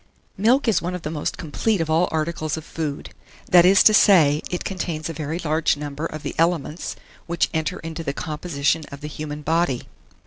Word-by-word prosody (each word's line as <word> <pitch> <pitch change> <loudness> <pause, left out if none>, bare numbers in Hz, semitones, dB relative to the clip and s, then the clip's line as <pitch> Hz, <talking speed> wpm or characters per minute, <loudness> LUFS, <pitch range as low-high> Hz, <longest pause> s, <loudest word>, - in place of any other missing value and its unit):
MILK 240 +7 +3
is 210 -7 +3
one 180 +1 -3
of 180 - -7
the 150 - -3
most 150 -2 -3
complete 190 +6 -1
of 165 - 0
all 160 +3 +2
articles 155 -1 -2
of 160 - -8
food: 155 -4 -5 0.4
that 175 -1 +8
is 195 +1 +6
to 215 - +7
say, 160 -8 +5
it 180 - -3
contains 170 -4 -3
a - - -4
very 155 +1 -4
large 160 -2 +1
number 150 +2 -4
of 155 -2 -8
the - - -4
elements 165 -1 0 0.3
which 170 -1 0
enter 160 +3 -1
into 165 0 -6
the 140 - -2
composition 155 0 -1
of 140 +1 -9
the 150 - -5
human 150 0 -6
body. 160 -5 +1
160 Hz, 200 wpm, -23 LUFS, 150-175 Hz, 0.4 s, that